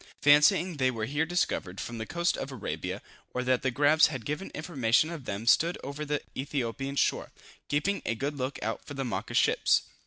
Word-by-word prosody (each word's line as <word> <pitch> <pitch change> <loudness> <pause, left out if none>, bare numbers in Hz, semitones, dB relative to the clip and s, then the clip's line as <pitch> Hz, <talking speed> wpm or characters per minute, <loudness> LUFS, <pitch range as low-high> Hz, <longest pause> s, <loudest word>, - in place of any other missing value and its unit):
Fancying 155 +4 +5
they 130 -2 +3
were 115 -3 -2
here 145 +6 -1
discovered, 100 - -1
from 115 -1 -5
the 110 - -5
coast 170 0 0
of 135 - -5
Arabia, 130 -6 -5 0.3
or 125 - 0
that 125 0 +2
the 130 - +1
grabs 145 +4 +5
had 135 -7 -6
given 150 +6 -3
information 155 -2 +1
of 155 -7 -7
them 100 +1 -3
they - - -10
stood 170 +8 +4
over 140 +2 -6
for - - -2
the 145 0 -2
Ethiopian 135 0 -3
shore, - - 0 0.4
keeping 165 +8 0
a 115 - -1
good 140 +5 -3
look 130 0 -3
out 110 +1 -3
for 145 - -9
the 135 -1 -2
Mocha 120 - -4
ships. - - +3
140 Hz, 210 wpm, -29 LUFS, 125-155 Hz, 0.4 s, Fancying